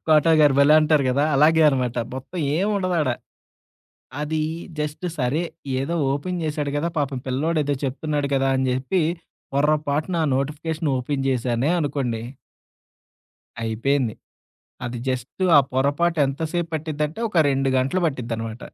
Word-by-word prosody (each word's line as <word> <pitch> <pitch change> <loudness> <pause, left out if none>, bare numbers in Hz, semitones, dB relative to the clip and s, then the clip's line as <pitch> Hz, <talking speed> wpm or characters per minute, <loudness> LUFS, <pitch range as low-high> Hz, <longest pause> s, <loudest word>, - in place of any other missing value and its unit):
'Quota' 155 +1 +5
గారు 145 -3 +5
భలే 145 +2 +6
అంటారు 150 -2 +3
గదా! 140 +3 +2
అలాగే 160 +3 +5
అనమాట. 125 -3 0 0.2
మొత్తం 135 +7 -7 0.2
ఏం 195 +4 +1
ఉండదాడ. 180 -7 0 1.1
అది 155 +1 -1 0.4
జస్ట్ 150 +4 -3
సరే 135 +5 0 0.4
ఏదో 160 +6 -2 0.2
ఓపెన్ 175 +5 -2
జేశాడు 150 -2 -2
గదా! 170 +3 0
పాపం 135 -2 -1
పిల్లోడేదో 145 +2 0
చెప్తున్నాడు 145 +1 -2
గదా! 135 0 +2
అని 130 0 +1
జెప్పి, 130 +9 0 0.5
పొర 145 +2 +3 0.2
పాటునా 160 +4 0
నోటిఫికేషన్ 150 +3 -2
ఓపెన్ 135 +2 -2
చేశానే 125 +2 0
అనుకోండి. 135 -6 -2 1.4
అయిపోయింది. 120 +2 0 0.7
అది 120 0 -4
జస్ట్ 130 +8 -3
ఆ - - +9
పొరపాటు 145 +6 +1
ఎంతసేపు 160 +5 -2
పట్టిద్దంటే 155 +3 -3
ఒక 185 - 0
2 135 0 +1
గంటలు 135 +9 0
పట్టిద్దనమాట. 115 -4 -4
145 Hz, 130 wpm, -23 LUFS, 130-160 Hz, 1.4 s, ఆ